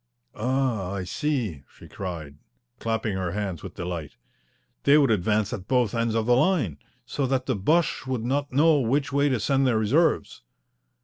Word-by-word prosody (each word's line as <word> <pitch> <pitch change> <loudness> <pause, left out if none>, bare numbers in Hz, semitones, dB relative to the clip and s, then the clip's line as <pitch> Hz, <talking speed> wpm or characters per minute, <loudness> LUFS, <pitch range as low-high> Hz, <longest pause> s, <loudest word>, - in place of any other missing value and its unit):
"Ah, 120 -5 -1
I 95 -2 -3
see," 115 - -2 0.2
she - - -13
cried, 80 -6 -7 0.4
clapping 110 -2 -1
her 90 -2 -2
hands 100 -5 -3
with - - -9
delight. 85 -4 -5 0.7
"They 140 +1 +5
would 140 -5 +4
advance 105 +1 +1
at 95 -1 -6
both 125 -5 +2
ends 115 -1 0
of 110 -1 +1
the 120 +1 +4
line, 130 - +1 0.3
so 140 -2 -2
that 130 -1 0
the 130 - 0
Boches 155 - +1
would 125 -3 -2
not 140 +3 -1
know 150 +3 +4
which 140 +4 0
way 140 +1 +3
to 130 -4 0
send 135 +4 +2
their 120 -3 +2
reserves." 140 +11 +1
115 Hz, 175 wpm, -25 LUFS, 100-135 Hz, 0.7 s, They